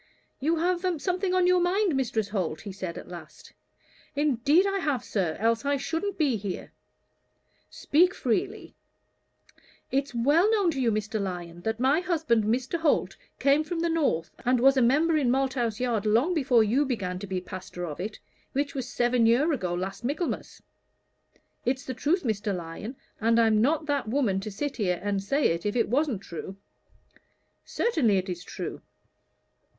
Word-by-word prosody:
"You 315 +5 +1
have 350 +2 0 0.2
something 365 +2 0
on 365 -1 +3
your 365 0 +4
mind, 370 +2 +2
Mrs. 230 -6 -1
Holt?" 180 -7 -2
he 205 - -7
said, 185 -3 -6
at - - -9
last. 175 -1 -11 0.6
"Indeed 290 - +3
I 395 0 0
have, 290 - -1
sir, 180 -6 -1
else 225 +1 +1
I 285 0 +1
shouldn't 330 +8 -3
be 280 -8 +2
here." 195 -2 -6 1.0
"Speak 360 +6 +2
freely." 390 - -2 1.2
"It's 275 -1 -1
well 295 - +4
known 405 -6 +3
to 270 -4 -3
you, 235 -2 +2
Mr. 215 0 -2
Lyon, 175 -3 -5
that 220 +4 -2
my 270 +5 +3
husband, 315 - +1
Mr. 250 +9 0
Holt, 325 -2 +1 0.2
came 280 +2 +3
from 330 +1 -3
the 340 0 +1
north, 285 - 0
and 250 0 +2
was 270 +3 +5
a 260 - +3
member 300 +7 +3
in 270 -5 +2
Malthouse 255 -4 0
Yard 230 -4 0
long 240 +12 +3
before 255 -8 +4
you 240 +7 +2
began 195 -9 -3
to 200 - -7
be 185 -1 -2
pastor 180 -1 -7
of 150 -3 -6
it, 210 +4 -4 0.4
which 280 +1 -1
was 260 -2 -4
seven 240 -1 +2
year 265 +8 +3
ago 185 -10 -2
last 190 +5 -4
Michaelmas. 290 +8 -3 1.0
It's 260 +2 -1
the 260 - -4
truth, 310 +9 0
Mr. 210 -4 -1
Lyon, 175 +8 -6 0.2
and 230 +1 +3
I'm 220 -2 +4
not 305 +5 +2
that 285 -6 -1
woman 225 -7 +1
to 205 +2 -5
sit 265 +8 -4
here 180 -6 0
and 200 -1 0
say 275 +9 +1
it 170 0 -2
if 210 +1 -1
it 230 -3 +1
wasn't 255 -5 0
true." 175 +3 -7 1.1
"Certainly, 275 - +1
it 190 +1 -2
is 175 -1 -5
true." - - -6
250 Hz, 175 wpm, -27 LUFS, 205-300 Hz, 1.2 s, was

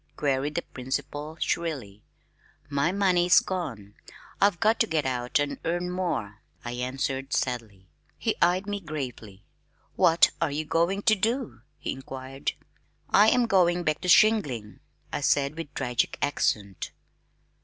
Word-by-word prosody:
queried 145 +1 0
the 170 - -1
principal 145 +4 -5
shrilly. 130 -12 -2 0.7
"My 145 +4 +1
money's 180 -2 +4
gone. 115 - -5 0.5
I've 200 -3 +4
got 220 +1 +3
to - - +3
get 160 -3 0
out 125 -1 0
and 145 -1 -1
earn 175 +2 -1
more," 130 - -3 0.2
I 120 - -3
answered 135 +2 -3
sadly. 110 -7 -3 0.3
He - - -1
eyed 180 +3 +3
me 205 0 -3
gravely. 125 - -7 0.5
"What 170 -2 +5
are 165 - +2
you 150 +2 -3
going 170 +6 +1
to 220 - +5
do?" 225 - -1 0.2
he - - -4
inquired. 135 0 -5 0.6
"I 210 +2 +7
am 245 +1 +3
going 180 -4 +3
back 155 -2 0
to - - -4
shingling," 160 - +3 0.3
I - - -1
said 140 +1 +2
with 165 -3 -6
tragic 125 -3 -1
accent. 100 -8 -1
150 Hz, 140 wpm, -27 LUFS, 130-180 Hz, 0.7 s, I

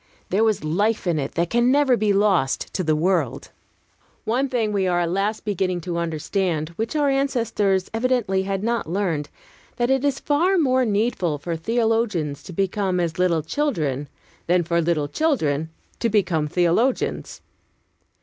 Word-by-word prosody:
There 200 +4 +3
was 215 -7 +1
life 205 +9 0
in 170 -3 +1
it 135 - -4
that 170 0 -1
can 240 +1 +3
never 280 -2 +4
be 215 -3 +1
lost 195 -9 +1
to 185 - -1
the 155 -2 +2
world. 165 -4 0 0.7
One 260 +5 0
thing 225 -5 0
we 195 -2 +1
are 175 -1 +1
at 170 -1 -1
last 205 +4 -1
beginning 185 -3 -1
to 170 0 -3
understand, 165 0 -1
which 225 - -4
our 295 -1 +2
ancestors 230 -8 0
evidently 225 -5 +1
had 195 0 -3
not 230 -6 -1
learned; 170 -6 -1 0.5
that 240 +1 0
it 265 0 +2
is 280 -2 0
far 345 +7 +2
more 260 -5 +3
needful 205 -7 0
for 165 +4 -4
theologians 215 - 0
to - - -8
become 190 0 -1
as 170 -1 -2
little 170 -4 +2
children, 155 - -2 0.4
than 175 +1 +3
for 170 +1 +1
little 160 -3 0
children 160 - 0 0.3
to 235 - +1
become 180 -8 +1
theologians. 180 - 0
195 Hz, 160 wpm, -23 LUFS, 170-235 Hz, 0.7 s, never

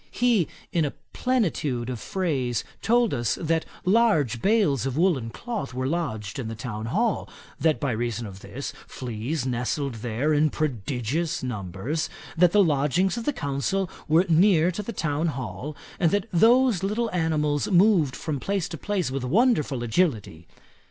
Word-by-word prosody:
He 235 - +2 0.3
in 170 - +2
a 145 - -2 0.2
plenitude 160 - 0
of 125 -3 -4
phrase 135 - -1 0.2
told 235 -1 +3
us, 120 -2 0
that 160 -1 0 0.2
large 180 - +3
bales 180 - +2
of 135 +1 -3
woollen 160 -10 +2
cloth 205 - -5
were 130 0 -1
lodged 130 - -2
in 120 - -3
the 115 - -5
town 110 -2 -5
hall; 215 - 0 0.3
that 160 -2 +2
by 140 - 0
reason 120 +1 -2
of 95 -2 -9
this, 140 +7 -6
fleas 125 +4 -4
nestled 130 +2 -1
there 125 +7 0
in 150 +1 +3
prodigious 140 - -2
numbers; 110 - -3 0.3
that 175 +1 +5
the 205 +1 +5
lodgings 155 +4 +2
of 235 -1 -5
the - - +2
counsel 165 - -1 0.2
were 165 +4 +4
near 175 0 +4
to 185 - -4
the 210 - -5
town 155 -4 -1
hall; 145 +1 -5 0.2
and 170 - +4
that 205 +4 0
those 235 +2 +5
little 215 +4 -1
animals 155 -3 0
moved 180 -8 +4
from 150 0 -3
place 195 +3 -1
to 165 -4 -7
place 195 -9 -1
with 135 -1 -3
wonderful 150 - +2
agility. 110 - 0
155 Hz, 160 wpm, -25 LUFS, 125-190 Hz, 0.3 s, that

